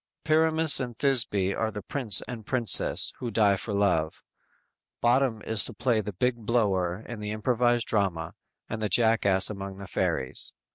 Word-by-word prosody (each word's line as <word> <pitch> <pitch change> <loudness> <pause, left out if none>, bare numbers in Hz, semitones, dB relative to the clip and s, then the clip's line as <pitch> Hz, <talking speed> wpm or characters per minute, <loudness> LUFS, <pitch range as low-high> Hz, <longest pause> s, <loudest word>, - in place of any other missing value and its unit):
Pyramus 160 -1 +3
and 120 -4 -5
Thisby 110 -8 +1
are 110 - -2
the 105 -2 -8
prince 110 -5 +2
and 120 -3 -7
princess, 120 0 +2
who 120 - -4
die 105 -2 +3
for 105 +3 -6
love. 90 -6 0 0.8
Bottom 120 -2 +1
is 110 -3 0
to 120 - -6
play 120 -1 0
the 105 0 -6
big 125 +6 -1
blower 105 -5 -1
in 120 -2 -7
the 105 0 -5
improvised 120 +2 0
drama 90 -6 -1 0.3
and 110 - -5
the 105 - -1
Jackass 110 -5 +2
among 100 -1 -7
the 100 - -9
fairies. 65 -7 -2
110 Hz, 160 wpm, -26 LUFS, 100-120 Hz, 0.8 s, Pyramus